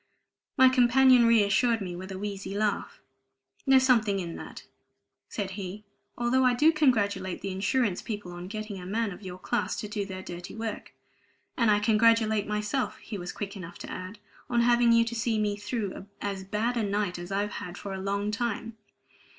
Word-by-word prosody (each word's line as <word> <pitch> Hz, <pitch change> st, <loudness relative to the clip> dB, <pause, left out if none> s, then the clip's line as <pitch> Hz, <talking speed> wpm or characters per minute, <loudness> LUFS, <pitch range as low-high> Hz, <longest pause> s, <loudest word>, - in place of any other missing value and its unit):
My 260 Hz, -, +8 dB
companion 255 Hz, -1 st, +6 dB
reassured 230 Hz, +1 st, +4 dB
me 180 Hz, -4 st, -5 dB
with 185 Hz, +2 st, -7 dB
a 190 Hz, -, -5 dB
wheezy 200 Hz, 0 st, -5 dB
laugh. 210 Hz, -1 st, -1 dB, 0.7 s
"There's 265 Hz, -1 st, +6 dB
something 220 Hz, -6 st, +3 dB
in 170 Hz, -3 st, -4 dB
that," -, -, -9 dB, 0.7 s
said 200 Hz, -3 st, -3 dB
he, 195 Hz, +1 st, -6 dB, 0.3 s
"although 240 Hz, +2 st, +2 dB
I 250 Hz, -1 st, +4 dB
do 305 Hz, +6 st, +5 dB
congratulate 205 Hz, -, +1 dB
the 195 Hz, -, -3 dB
insurance 195 Hz, +1 st, 0 dB
people 205 Hz, -5 st, -6 dB
on 175 Hz, +1 st, -7 dB
getting 215 Hz, -1 st, -6 dB
a -, -, -8 dB
man 220 Hz, +2 st, -1 dB
of 180 Hz, -, -10 dB
your 185 Hz, -2 st, -7 dB
class 240 Hz, +6 st, -1 dB
to 210 Hz, -, -4 dB
do 205 Hz, -1 st, -3 dB
their 190 Hz, -1 st, -7 dB
dirty 175 Hz, +1 st, -8 dB
work. 225 Hz, -1 st, -5 dB, 0.6 s
And 230 Hz, -3 st, +3 dB
I 210 Hz, -, +5 dB
congratulate 220 Hz, 0 st, +3 dB
myself," 210 Hz, +5 st, -1 dB
he 210 Hz, -3 st, -7 dB
was 175 Hz, 0 st, -5 dB
quick 200 Hz, -1 st, -6 dB
enough 175 Hz, -3 st, -8 dB
to -, -, -8 dB
add, 185 Hz, +4 st, -7 dB, 0.3 s
"on 240 Hz, -1 st, +2 dB
having 240 Hz, 0 st, +4 dB
you 230 Hz, 0 st, +5 dB
to 230 Hz, -, -4 dB
see 230 Hz, -1 st, 0 dB
me 210 Hz, -1 st, 0 dB
through 205 Hz, -2 st, -4 dB
as 195 Hz, -2 st, -4 dB
bad 225 Hz, +5 st, -1 dB
a -, -, +1 dB
night 200 Hz, -3 st, -1 dB
as 175 Hz, +2 st, -8 dB
I've 205 Hz, +1 st, -1 dB
had 180 Hz, -1 st, -7 dB
for 200 Hz, -, -6 dB
a 190 Hz, -, -5 dB
long 200 Hz, +2 st, -1 dB
time. 225 Hz, 0 st, -3 dB
210 Hz, 190 wpm, -28 LUFS, 195-230 Hz, 0.7 s, My